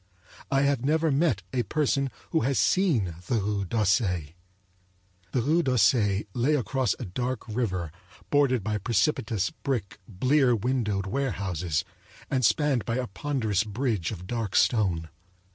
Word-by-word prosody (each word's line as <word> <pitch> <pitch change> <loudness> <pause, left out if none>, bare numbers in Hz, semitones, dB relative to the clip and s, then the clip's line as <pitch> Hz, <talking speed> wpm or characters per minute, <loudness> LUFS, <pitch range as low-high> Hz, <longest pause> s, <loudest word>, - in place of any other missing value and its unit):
I 135 0 +2
have 140 -3 +1
never 155 +2 +2
met 135 - +1
a 125 - +2
person 140 +2 0 0.2
who 160 - +3
has 130 +1 0
seen 120 - +2
the 125 - +1
Rue 100 -2 -1
d'Auseil. 95 - +1 1.0
The 120 - 0
Rue 160 +6 +3
d'Auseil 105 - +3
lay 130 +6 +2
across 130 -3 0
a 125 - -5
dark 125 +7 -3
river 95 -8 -2 0.4
bordered 135 -6 +3
by 105 0 -1
precipitous 110 - 0
brick 125 -11 -4
blear 130 +5 +2
windowed 110 -4 -1
warehouses 95 - -2 0.5
and 130 -2 +1
spanned 125 +3 +2
by 115 - -2
a 130 - -1
ponderous 110 -3 -1
bridge 110 -4 -1
of 90 -5 -7
dark 115 -1 -3
stone. 90 -9 +2
115 Hz, 140 wpm, -27 LUFS, 100-135 Hz, 1.0 s, who